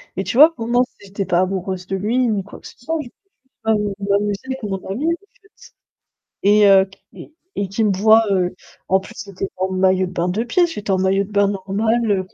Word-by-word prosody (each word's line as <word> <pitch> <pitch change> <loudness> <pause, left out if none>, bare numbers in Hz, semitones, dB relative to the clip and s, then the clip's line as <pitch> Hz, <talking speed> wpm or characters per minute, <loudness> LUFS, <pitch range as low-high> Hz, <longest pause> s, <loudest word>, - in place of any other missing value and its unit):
et 190 - -2
tu 230 - -3
vois 310 +4 +8
pour 230 -6 -6
moi 245 +1 +3
c'est 200 - -18
j'étais 195 0 -4
pas 175 -2 +1
amoureuse 185 -1 -2
de 195 - -2
lui 215 +6 0
ni 205 -3 -1
quoi 205 - -12
que - - -12
ce - - -15
soit, 320 +7 -3
je 255 - -10 0.6
m 220 - +4 0.2
je 200 - -5
m'amusais 200 0 +1
avec 265 0 -5
mon 200 -3 -3
ami 245 +11 -2
en - - +3 0.3
fait, 400 0 -20 0.7
et 205 +1 +5
heu, 195 -1 +6
q 190 0 -20 0.2
et - - -12 0.2
et 200 - -1
qui 195 +4 -1
me 210 - +3
voit, 215 +4 +5
heu 180 -2 0 0.3
en 190 0 +2
plus, - - -12
c'était 200 -2 -6
en 185 +1 -1
maillot 185 0 +2
de - - -9
bain 175 0 -1
2 215 +6 -1
pièces. 345 +8 +2
J'étais 205 -6 -4
en 190 - +2
maillot 190 +1 +1
de 205 - -15
bain 200 -1 +3
normal, 210 +4 -1
heu 190 -2 +1
200 Hz, 245 wpm, -20 LUFS, 190-225 Hz, 0.7 s, vois